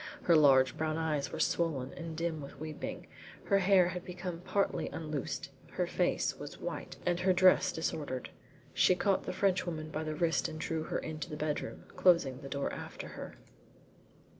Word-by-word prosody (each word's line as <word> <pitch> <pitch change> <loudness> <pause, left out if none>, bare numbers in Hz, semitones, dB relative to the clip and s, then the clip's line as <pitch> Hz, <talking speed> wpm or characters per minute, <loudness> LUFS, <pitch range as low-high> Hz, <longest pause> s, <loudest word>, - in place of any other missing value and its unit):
Her 170 - +5
large 135 -4 +6
brown 155 0 -1
eyes 155 -3 -1
were - - -5
swollen 140 -6 0
and 165 -2 -6
dim 165 -2 -2
with 140 -1 -10
weeping, 155 0 -5 0.4
her 200 -1 +3
hair 190 -2 +5
had 180 -1 -5
become 180 -1 -5
partly 200 +3 0
unloosened, 150 -4 -4 0.2
her - - 0
face - - 0
was - - -7
white - - -5
and 175 0 +1
her 185 +1 +3
dress 185 0 +5
disordered. 150 -6 -3 0.4
She 185 - +5
caught 195 +1 +1
the - - -2
Frenchwoman 180 -5 0
by 155 +1 -2
the 155 0 -3
wrist 165 +1 +1
and 155 - -7
drew 160 0 -2
her - - -2
into 155 +1 -5
the 150 - -5
bedroom, 150 -1 -3
closing 150 -8 +4
the 135 - -8
door 140 0 -2
after - - -7
her. - - -8
160 Hz, 175 wpm, -32 LUFS, 150-180 Hz, 0.4 s, large